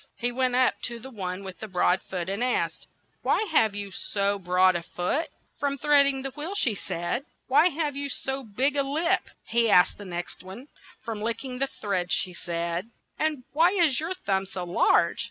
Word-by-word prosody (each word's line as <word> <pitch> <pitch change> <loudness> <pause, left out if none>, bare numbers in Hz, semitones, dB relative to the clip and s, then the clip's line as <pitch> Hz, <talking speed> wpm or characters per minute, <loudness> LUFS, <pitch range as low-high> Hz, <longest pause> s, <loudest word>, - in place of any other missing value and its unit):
He 245 +1 0
went 255 0 +1
up 255 0 +4
to 240 -1 -4
the 260 +3 -9
one 190 -3 -4
with 190 -1 -8
the 220 - -6
broad 185 -1 +2
foot 180 -2 -5
and 200 +5 -1
asked, 250 - -1 0.3
"Why - - +2
have 220 -9 +3
you 200 -1 -5
so 200 +1 -1
broad 185 0 +3
a 170 - -1
foot?" 180 - -2 0.3
"From 280 -1 0
treading 280 -1 +4
the 270 - -3
wheel," 305 +8 -5
she 260 - +2
said. 175 +5 -3 0.2
'Why 295 +7 +5
have 300 -3 -2
you 280 0 -3
so 270 0 -2
big 260 +6 +1
a 280 - +3
lip?" 320 +7 0 0.2
he 235 -1 +2
asked 180 -1 +5
the 205 - -8
next 175 -1 -6
one. 200 +10 -10 0.4
"From 220 -2 -4
lick 230 +3 -2
ing 250 -1 -5
the 275 - +2
thread," 195 -8 -2
she 185 - 0
said. 170 +3 -3 0.2
' - - -39
'And 305 -4 0
why 335 +5 +4
is 335 -9 +4
your 330 +4 -2
thumb 195 - -1
so 185 -1 -5
large 175 0 +3
235 Hz, 205 wpm, -27 LUFS, 190-280 Hz, 0.4 s, Why